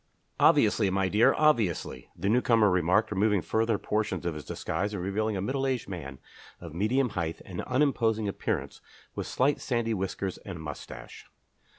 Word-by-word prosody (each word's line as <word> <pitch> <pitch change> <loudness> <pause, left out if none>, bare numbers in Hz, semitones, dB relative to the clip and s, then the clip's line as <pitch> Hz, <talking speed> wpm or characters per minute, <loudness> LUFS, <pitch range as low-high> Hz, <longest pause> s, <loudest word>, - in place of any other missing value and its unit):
"Obviously, 105 -1 +4
my 95 0 +1
dear, 105 +4 +4
obviously," 120 - +1
the 95 - -3
newcomer 115 -2 +4
remarked, 90 +5 +2
removing 105 -1 +2
further 110 -1 +1
portions 105 -6 -2
of 85 - -1
his 75 -1 -7
disguise 100 +9 -3
and 90 - -4
revealing 105 +2 -1
a - - -2
middle 135 +6 -1
aged 130 -4 -2
man 75 -8 -7 0.4
of 85 -3 -9
medium 120 +9 +1
height 85 -5 -3
and 90 -2 -5
unimposing 120 -5 +1
appearance, 100 - -3 0.3
with - - -4
slight 140 +3 +1
sandy 120 -3 -1
whiskers 95 -1 -3
and 95 -4 -8
moustache. 75 -2 -9
105 Hz, 160 wpm, -28 LUFS, 90-115 Hz, 0.4 s, Obviously